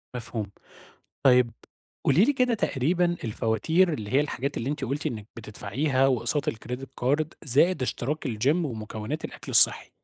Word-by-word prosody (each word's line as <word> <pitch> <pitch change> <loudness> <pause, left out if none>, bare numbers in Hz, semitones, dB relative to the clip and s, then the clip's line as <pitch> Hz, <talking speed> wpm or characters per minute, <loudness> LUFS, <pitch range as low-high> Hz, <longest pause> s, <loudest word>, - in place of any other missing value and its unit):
مفهوم، 115 -3 -4 0.8
طيب 125 -3 +5 0.5
قولي 190 - +4
لي 285 - +2
كده 250 -3 +1
تقريبًا 175 - 0
الفواتير 115 - +1
اللي 105 -8 -5
هي 135 - +4
الحاجات 140 -1 -3
اللي 120 - -3
أنتِ 145 -2 -3
قُلتِ 140 +5 -3
إنِّك 110 -8 -4
بتدفعيها 130 +5 -1
واقساط 135 +3 0
الcredit 125 +4 -7 0.2
card 145 +4 +2 0.2
زائد 150 +4 +3
اشتراك 140 +4 -2
الgym 115 +2 -1
ومكوّنات 115 -2 -4
الأكل - - -8
الصحّي، - - +6
135 Hz, 145 wpm, -26 LUFS, 115-155 Hz, 0.8 s, الصحّي